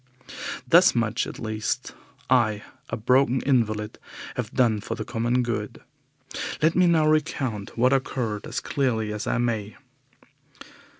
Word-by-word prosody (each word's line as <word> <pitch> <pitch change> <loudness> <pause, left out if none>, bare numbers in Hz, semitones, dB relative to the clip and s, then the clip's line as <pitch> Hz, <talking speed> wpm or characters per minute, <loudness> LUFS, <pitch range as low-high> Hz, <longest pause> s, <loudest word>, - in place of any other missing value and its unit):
Thus 175 -2 +6
much 115 0 0
at - - -8
least 110 -1 -3 0.3
I, 110 -5 +2 0.3
a - - -3
broken 130 +3 +3
invalid, 110 -5 0 0.4
have - - -3
done 115 -4 +2
for 115 - -4
the - - -5
common 120 +1 0
good. 115 -3 -3 0.8
Let 160 +2 +3
me 180 0 +5
now 165 -2 +4
recount 135 -9 -1
what 125 +3 +4
occurred 120 -5 -2
as - - -3
clearly 115 -6 -1
as 105 - -4
I - - +1
may. 110 -4 -1
120 Hz, 135 wpm, -25 LUFS, 110-130 Hz, 0.8 s, Thus